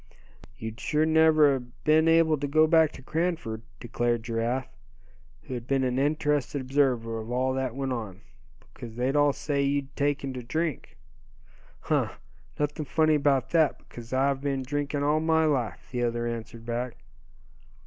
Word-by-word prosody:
"You'd 110 Hz, 0 st, -7 dB
sure 155 Hz, +6 st, +1 dB
never 160 Hz, -2 st, +5 dB
a 135 Hz, -, -1 dB
been 155 Hz, +6 st, +1 dB
able 165 Hz, -1 st, +5 dB
to 145 Hz, -, -2 dB
go 155 Hz, +3 st, +4 dB
back 160 Hz, -1 st, +4 dB
to -, -, -12 dB
Cranford," 155 Hz, -8 st, -2 dB, 0.2 s
declared 120 Hz, 0 st, -1 dB
Giraffe, 120 Hz, +3 st, -2 dB, 0.7 s
who -, -, -7 dB
had 120 Hz, -1 st, -6 dB
been 135 Hz, 0 st, +1 dB
an 130 Hz, 0 st, 0 dB
interested 145 Hz, -1 st, 0 dB
observer 130 Hz, -4 st, 0 dB
of 110 Hz, +1 st, -7 dB
all 130 Hz, +2 st, 0 dB
that 130 Hz, -2 st, -2 dB
went 135 Hz, -1 st, -2 dB
on. 105 Hz, -5 st, -6 dB, 0.5 s
"Because 115 Hz, -2 st, -9 dB
they'd 125 Hz, +4 st, 0 dB
all 145 Hz, 0 st, +4 dB
say 140 Hz, 0 st, -2 dB
you'd 140 Hz, -1 st, -1 dB
taken 140 Hz, -2 st, -1 dB
to 125 Hz, -, -5 dB
drink." 155 Hz, +3 st, -3 dB, 0.8 s
"Huh! -, -, 0 dB, 0.4 s
nothing 150 Hz, +1 st, -1 dB
funny 155 Hz, +3 st, +2 dB
about 140 Hz, -3 st, +2 dB
that, 160 Hz, -4 st, +3 dB
because 115 Hz, -1 st, -12 dB
I've 135 Hz, +1 st, +1 dB
been 135 Hz, -2 st, -1 dB
drinking 145 Hz, +1 st, -2 dB
all 150 Hz, +2 st, +2 dB
my 160 Hz, 0 st, +2 dB
life," 125 Hz, -, -1 dB
the 125 Hz, -1 st, -2 dB
other 120 Hz, 0 st, -1 dB
answered 115 Hz, 0 st, -6 dB
back. 120 Hz, +1 st, -3 dB
135 Hz, 160 wpm, -27 LUFS, 120-150 Hz, 0.8 s, never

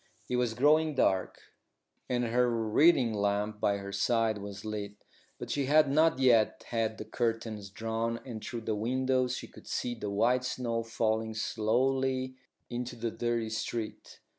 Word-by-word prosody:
It 125 Hz, -, 0 dB
was 120 Hz, -2 st, 0 dB
growing 150 Hz, +4 st, +4 dB
dark, 95 Hz, -7 st, +1 dB, 0.7 s
and 125 Hz, -1 st, +1 dB
her 120 Hz, +1 st, +2 dB
reading 115 Hz, +3 st, +3 dB
lamp 105 Hz, +1 st, 0 dB
by 100 Hz, -1 st, +2 dB
her 100 Hz, 0 st, -7 dB
side 115 Hz, 0 st, +1 dB
was 100 Hz, 0 st, -8 dB
lit; 105 Hz, -1 st, -4 dB, 0.4 s
but -, -, -6 dB
she 140 Hz, -1 st, 0 dB
had 150 Hz, -1 st, +5 dB
not 160 Hz, +2 st, +4 dB
yet 120 Hz, -5 st, +3 dB
had 110 Hz, -2 st, -1 dB
the -, -, -6 dB
curtains 115 Hz, -4 st, -2 dB
drawn, 115 Hz, +2 st, -2 dB
and 115 Hz, -5 st, -7 dB
through 120 Hz, -4 st, -5 dB
the 110 Hz, 0 st, -2 dB
windows 130 Hz, +3 st, 0 dB
she -, -, -6 dB
could -, -, -15 dB
see 120 Hz, -, -2 dB
the 110 Hz, -3 st, -5 dB
white 120 Hz, +5 st, +2 dB
snow 120 Hz, -2 st, -2 dB
falling 110 Hz, -1 st, -1 dB
slowly 130 Hz, +4 st, 0 dB, 0.3 s
into 120 Hz, 0 st, -4 dB
the 115 Hz, -1 st, -3 dB
dirty 115 Hz, -1 st, -1 dB
street. 110 Hz, 0 st, -5 dB
115 Hz, 160 wpm, -30 LUFS, 110-125 Hz, 0.7 s, had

